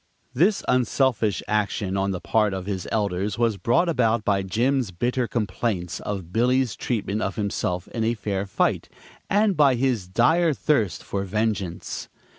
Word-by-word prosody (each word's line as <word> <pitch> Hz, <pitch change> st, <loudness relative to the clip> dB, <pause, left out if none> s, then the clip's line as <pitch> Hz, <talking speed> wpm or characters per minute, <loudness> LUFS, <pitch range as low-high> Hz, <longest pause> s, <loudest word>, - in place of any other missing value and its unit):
This 190 Hz, -, +2 dB
unselfish 125 Hz, -4 st, +1 dB
action 105 Hz, -2 st, -1 dB
on 100 Hz, 0 st, 0 dB
the 95 Hz, -2 st, -2 dB
part 105 Hz, -1 st, +1 dB
of 95 Hz, -1 st, -5 dB
his 95 Hz, -3 st, -4 dB
elders 100 Hz, -1 st, -1 dB
was 115 Hz, -3 st, +1 dB
brought 130 Hz, -, +2 dB
about 115 Hz, -8 st, +1 dB
by 100 Hz, -2 st, +2 dB
Jim's 120 Hz, +5 st, 0 dB
bitter 120 Hz, +7 st, -1 dB
complaints 100 Hz, -4 st, -2 dB
of 95 Hz, -4 st, -5 dB
Billy's 125 Hz, 0 st, +2 dB
treatment 110 Hz, -3 st, -2 dB
of 95 Hz, -, -2 dB
himself 100 Hz, -4 st, -2 dB
in 115 Hz, -, -3 dB
a 115 Hz, +1 st, +1 dB
fair 100 Hz, -2 st, -3 dB
fight, 95 Hz, -, 0 dB, 0.4 s
and 205 Hz, -1 st, +3 dB
by 140 Hz, -4 st, +5 dB
his 120 Hz, -6 st, 0 dB
dire 160 Hz, -, +3 dB
thirst 115 Hz, -, 0 dB
for 100 Hz, -1 st, -3 dB
vengeance. 100 Hz, -3 st, -2 dB
110 Hz, 155 wpm, -24 LUFS, 95-125 Hz, 0.4 s, by